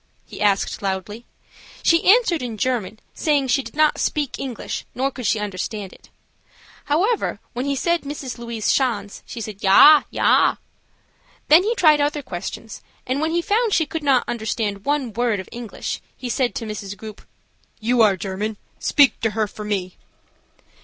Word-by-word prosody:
he -, -, -10 dB
asked, 205 Hz, +2 st, +1 dB
loudly. 200 Hz, +4 st, -4 dB, 0.6 s
She 335 Hz, +2 st, +3 dB
answered 405 Hz, -7 st, +4 dB
in 235 Hz, -3 st, -5 dB
German, 220 Hz, -2 st, -2 dB
saying 285 Hz, -4 st, +1 dB
she 275 Hz, -, +3 dB
did -, -, -11 dB
not 305 Hz, 0 st, +3 dB
speak 290 Hz, -4 st, -1 dB
English 260 Hz, -4 st, -5 dB
nor 270 Hz, +2 st, 0 dB
could 250 Hz, -4 st, -4 dB
she 220 Hz, -, +1 dB
understand 205 Hz, 0 st, -5 dB
it. -, -, -19 dB, 0.8 s
However, 390 Hz, +10 st, 0 dB
when 250 Hz, +3 st, -3 dB
he 280 Hz, -, 0 dB
said 340 Hz, +5 st, 0 dB
Mrs. 275 Hz, -3 st, -6 dB
Louise 235 Hz, -2 st, -5 dB
Schanz, 205 Hz, -7 st, -1 dB
she 235 Hz, -, -7 dB
said 210 Hz, -2 st, -7 dB
"Yah, 290 Hz, +10 st, +8 dB
yah." -, -, +3 dB, 0.9 s
Then 315 Hz, +4 st, +8 dB
he 445 Hz, +5 st, 0 dB
tried 305 Hz, -7 st, +5 dB
other 290 Hz, 0 st, -1 dB
questions, 195 Hz, +2 st, -7 dB, 0.2 s
and 260 Hz, +3 st, -1 dB
when 315 Hz, -, +1 dB
he 340 Hz, +1 st, 0 dB
found 440 Hz, +2 st, +1 dB
she 320 Hz, -, +2 dB
could 325 Hz, +2 st, -5 dB
not 275 Hz, -4 st, +3 dB
understand 220 Hz, -3 st, -3 dB
one 280 Hz, -5 st, -1 dB
world 230 Hz, -2 st, 0 dB
of 190 Hz, -, -7 dB
English, 235 Hz, -2 st, -6 dB, 0.2 s
he 255 Hz, -, -6 dB
said 245 Hz, 0 st, 0 dB
to 230 Hz, -, -4 dB
Miss 210 Hz, -2 st, -6 dB
Grupe: 215 Hz, +1 st, -10 dB, 0.6 s
"You 235 Hz, +2 st, +2 dB
are 205 Hz, -3 st, +4 dB
German; 200 Hz, +3 st, -4 dB, 0.2 s
speak 285 Hz, -3 st, +3 dB
to 225 Hz, -, +1 dB
her 220 Hz, -, +2 dB
for 210 Hz, +1 st, -9 dB
me." 195 Hz, -3 st, -3 dB
240 Hz, 170 wpm, -21 LUFS, 210-290 Hz, 0.9 s, Yah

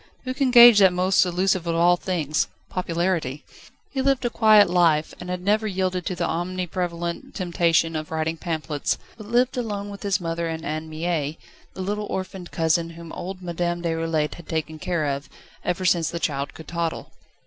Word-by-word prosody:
Who 255 Hz, -1 st, -3 dB
can 270 Hz, 0 st, +1 dB
gauge 240 Hz, -3 st, +9 dB
that 190 Hz, -2 st, +7 dB
most 185 Hz, +2 st, +3 dB
elusive 180 Hz, 0 st, +1 dB
of 165 Hz, -, 0 dB
all 175 Hz, +1 st, +5 dB
things: 155 Hz, -, -1 dB, 0.2 s
Popularity? 170 Hz, -5 st, -1 dB, 0.5 s
He 270 Hz, -, -1 dB
lived 270 Hz, -1 st, +1 dB
a 240 Hz, -, 0 dB
quiet 215 Hz, -2 st, +6 dB
life, 170 Hz, -3 st, +2 dB
and 180 Hz, -, -7 dB
had 180 Hz, 0 st, -3 dB
never 215 Hz, +2 st, +2 dB
yielded 185 Hz, -2 st, -1 dB
to 185 Hz, -, -2 dB
the 175 Hz, -1 st, -1 dB
omni 180 Hz, +2 st, -2 dB
prevalent 170 Hz, -1 st, -4 dB
temptation 170 Hz, -3 st, +1 dB
of 155 Hz, 0 st, -4 dB
writing 160 Hz, 0 st, -1 dB
pamphlets, 160 Hz, -3 st, -2 dB, 0.2 s
but 215 Hz, -2 st, -11 dB
lived 245 Hz, +3 st, +2 dB
alone 205 Hz, -4 st, -3 dB
with 200 Hz, -, -9 dB
his 200 Hz, -2 st, 0 dB
mother 170 Hz, -1 st, -2 dB
and 160 Hz, 0 st, -4 dB
Anne 155 Hz, +1 st, -4 dB
Mie, 155 Hz, -2 st, -2 dB, 0.4 s
the 190 Hz, -, -4 dB
little 205 Hz, +2 st, -2 dB
orphaned 185 Hz, -1 st, -5 dB
cousin 165 Hz, 0 st, +1 dB
whom 165 Hz, 0 st, -10 dB
old 185 Hz, 0 st, -6 dB
Madame 175 Hz, 0 st, -2 dB
Déroulède 165 Hz, -2 st, 0 dB
had 170 Hz, -, -13 dB
taken 160 Hz, -1 st, -3 dB
care 170 Hz, -2 st, -1 dB
of, 140 Hz, 0 st, -3 dB, 0.3 s
ever 180 Hz, +1 st, -1 dB
since 170 Hz, -2 st, +3 dB
the 170 Hz, -, -4 dB
child 140 Hz, -3 st, -2 dB
could 160 Hz, -, -11 dB
toddle. 170 Hz, -1 st, -3 dB
175 Hz, 185 wpm, -24 LUFS, 160-190 Hz, 0.5 s, gauge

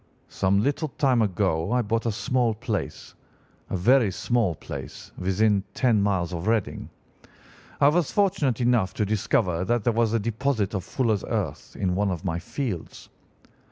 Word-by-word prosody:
"'Some 100 Hz, +2 st, +1 dB
little 145 Hz, +4 st, 0 dB
time 130 Hz, -4 st, +1 dB
ago 95 Hz, -4 st, 0 dB
I 125 Hz, 0 st, +2 dB
bought 115 Hz, +2 st, -1 dB
a -, -, +2 dB
small 120 Hz, +1 st, 0 dB
place—a 105 Hz, -3 st, -6 dB
very 120 Hz, +4 st, +4 dB
small 110 Hz, -3 st, 0 dB
place—within 100 Hz, +6 st, -2 dB
ten 120 Hz, -5 st, +3 dB
miles 95 Hz, -3 st, 0 dB
of 85 Hz, +3 st, -4 dB
Reading. 110 Hz, -3 st, -1 dB, 0.9 s
I 140 Hz, -, +6 dB
was 165 Hz, 0 st, +1 dB
fortunate 160 Hz, -, +1 dB
enough 120 Hz, -6 st, +2 dB
to 105 Hz, -, 0 dB
discover 105 Hz, -, 0 dB
that 120 Hz, +3 st, 0 dB
there 120 Hz, -, +2 dB
was 115 Hz, -1 st, +1 dB
a 115 Hz, -, +2 dB
deposit 115 Hz, -1 st, -1 dB
of 95 Hz, -3 st, -2 dB
fuller's 110 Hz, -1 st, 0 dB
earth -, -, -3 dB
in 90 Hz, -2 st, 0 dB
one 100 Hz, +2 st, +1 dB
of 90 Hz, +1 st, -4 dB
my 85 Hz, -2 st, -1 dB
fields. 100 Hz, -, -5 dB
110 Hz, 155 wpm, -25 LUFS, 95-120 Hz, 0.9 s, I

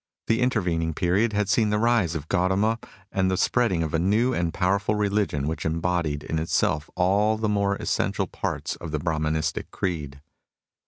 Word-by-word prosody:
The 115 Hz, +2 st, +1 dB
intervening 90 Hz, -10 st, 0 dB
period 100 Hz, +6 st, +2 dB
had 105 Hz, -1 st, +1 dB
seen 110 Hz, +1 st, +2 dB
the 105 Hz, -, +1 dB
rise 110 Hz, -7 st, +2 dB
of 80 Hz, -1 st, -5 dB
Gautama 95 Hz, +6 st, +1 dB, 0.3 s
and 95 Hz, -1 st, +1 dB
the 95 Hz, -, 0 dB
spreading 95 Hz, -5 st, +2 dB
of 80 Hz, -, -4 dB
a 80 Hz, -, +2 dB
new 110 Hz, +8 st, +2 dB
and 85 Hz, -4 st, 0 dB
powerful 100 Hz, +4 st, +1 dB
religion 100 Hz, -8 st, 0 dB
which 80 Hz, -, -3 dB
embodied 80 Hz, -2 st, -1 dB
in 80 Hz, -, -2 dB
itself 75 Hz, -2 st, 0 dB
all 100 Hz, +4 st, +2 dB
the 110 Hz, 0 st, -1 dB
more 100 Hz, -1 st, +1 dB
essential -, -, -1 dB
parts -, -, -4 dB
of 85 Hz, -, -7 dB
the 75 Hz, -, -1 dB
Brahmanistic 80 Hz, -1 st, -1 dB
creed. 75 Hz, -7 st, -3 dB
95 Hz, 170 wpm, -25 LUFS, 80-105 Hz, 0.3 s, period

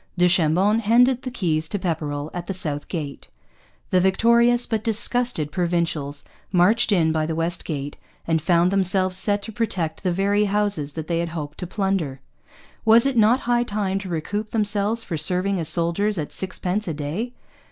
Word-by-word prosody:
Du 180 Hz, 0 st, +4 dB
Chambon 180 Hz, +5 st, +3 dB
handed 245 Hz, +3 st, +3 dB
the 255 Hz, -, -5 dB
keys 160 Hz, -9 st, -1 dB
to 205 Hz, -, -1 dB
Pepperrell 155 Hz, -5 st, -3 dB
at 175 Hz, -1 st, -6 dB
the 195 Hz, -, -3 dB
South 150 Hz, -5 st, -4 dB
Gate. 150 Hz, -6 st, -6 dB, 0.6 s
The 185 Hz, -, +4 dB
victorious 235 Hz, +5 st, +3 dB
but 220 Hz, -2 st, -2 dB
disgusted 230 Hz, -7 st, 0 dB
Provincials 170 Hz, -5 st, -2 dB, 0.3 s
marched 205 Hz, +6 st, +3 dB
in 165 Hz, -5 st, +3 dB
by 155 Hz, -1 st, 0 dB
the 160 Hz, -, -2 dB
West 165 Hz, +2 st, -1 dB
Gate, 145 Hz, -3 st, -5 dB, 0.3 s
and 165 Hz, -1 st, +1 dB
found 170 Hz, +2 st, +3 dB
themselves 185 Hz, -1 st, +2 dB
set 205 Hz, +2 st, +1 dB
to 225 Hz, -, -6 dB
protect 185 Hz, -8 st, -2 dB
the 185 Hz, -, 0 dB
very 200 Hz, +3 st, +1 dB
houses 200 Hz, -8 st, 0 dB
that 160 Hz, 0 st, -5 dB
they 170 Hz, 0 st, -1 dB
had 170 Hz, 0 st, -2 dB
hoped 150 Hz, -3 st, -6 dB
to 180 Hz, -, -4 dB
plunder. 190 Hz, -9 st, -2 dB, 0.6 s
Was 230 Hz, +2 st, +6 dB
it 275 Hz, -2 st, 0 dB
not 230 Hz, +3 st, +4 dB
high 240 Hz, 0 st, +1 dB
time 200 Hz, -4 st, -2 dB
to 195 Hz, -1 st, -7 dB
recoup 205 Hz, +6 st, -3 dB
themselves 210 Hz, +1 st, 0 dB
for 170 Hz, -7 st, -4 dB
serving 185 Hz, +4 st, 0 dB
as 160 Hz, -, 0 dB
soldiers 180 Hz, +5 st, +1 dB
at 150 Hz, -3 st, -4 dB
sixpence 190 Hz, +2 st, -3 dB
a 165 Hz, -, -2 dB
day? 165 Hz, +12 st, -4 dB
185 Hz, 180 wpm, -23 LUFS, 165-210 Hz, 0.6 s, Was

